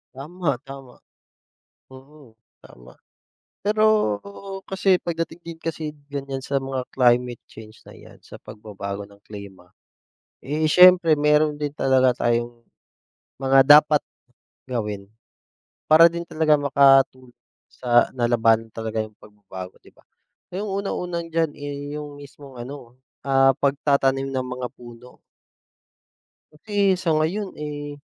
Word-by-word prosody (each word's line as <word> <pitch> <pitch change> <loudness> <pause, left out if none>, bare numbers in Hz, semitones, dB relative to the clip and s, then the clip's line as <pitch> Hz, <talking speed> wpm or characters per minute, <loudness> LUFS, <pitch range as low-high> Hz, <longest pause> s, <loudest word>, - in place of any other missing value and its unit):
Tama, 150 +2 -3
tama. 135 -2 -11 1.0
Mm, 135 -2 -16 0.2
tama. - - -17 0.7
Pero 215 +2 0 0.8
kasi 190 0 +1
pagdating 165 0 -4
din 165 -1 -9
kasi 160 -2 -4 0.2
ganyan 140 -1 -5
sa 135 +1 -5
mga 130 -1 -4
climate 125 -1 +1
change 110 -1 -14
na - - -15
'yan, - - -15
sa - - -13
pagbabago 100 -1 -8
ng 100 0 -17
klima, 100 -3 -11 0.7
eh, 150 +4 -2
siyempre, 180 +1 +6
meron 150 0 +2
din 145 - -1
talaga 130 -2 +2
tayong 120 0 -1 0.7
mga 135 0 +3 0.2
dapat 150 -1 +1 0.7
gawin 105 -5 -4 0.8
para 160 +2 +7
din 170 0 -6
talaga 155 -2 +2
makatulong 135 -3 +3 0.3
sa 120 -1 +2
na 120 - 0
lalabanan 115 -1 +2
talaga 110 0 -3
yung 110 0 -14
pagbabago, 95 -3 -11
'di - - -19
ba? - - -25 0.6
Yung 205 +1 -4
unang-una 180 -3 -4
diyan, 165 -1 0
eh, 145 0 -7
yung 145 -1 -9
mismong 140 -1 -13
ano, 125 -2 -11 0.3
ah, 135 0 +4
pagtatanim 135 -1 +1
ng 130 -1 -2
mga 125 0 -5
puno. 120 +1 -15 1.3
Kasi 195 +5 0
sa 180 -2 -2
ngayon, 170 +6 -1
eh, 145 -1 -6
135 Hz, 120 wpm, -23 LUFS, 120-155 Hz, 1.3 s, para